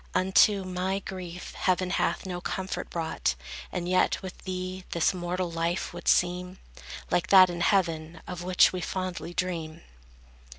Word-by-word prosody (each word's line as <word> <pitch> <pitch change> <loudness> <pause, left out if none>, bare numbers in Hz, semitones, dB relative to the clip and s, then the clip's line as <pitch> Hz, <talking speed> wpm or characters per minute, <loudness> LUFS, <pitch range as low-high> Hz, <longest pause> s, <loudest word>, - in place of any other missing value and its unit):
Unto 190 +2 +4
my 185 +1 -1
grief 180 -2 -7
heaven 185 0 0
hath - - 0
no 180 -1 -4
comfort 190 +1 -4
brought; 165 -1 -1 0.4
And 175 -1 -3
yet 185 0 +2
with 190 -1 -6
thee, 185 0 -4
this 170 +2 +2
mortal 180 0 -2
life 170 +2 -1
would - - -9
seem 180 +1 +2 0.5
Like 175 +1 +2
that 185 -2 +8
in 170 0 -5
heaven, 165 -4 +1
of 180 -1 -6
which 180 +1 +4
we 185 - -3
fondly 180 -1 -4
dream. 170 -3 -3
180 Hz, 145 wpm, -28 LUFS, 175-185 Hz, 0.5 s, that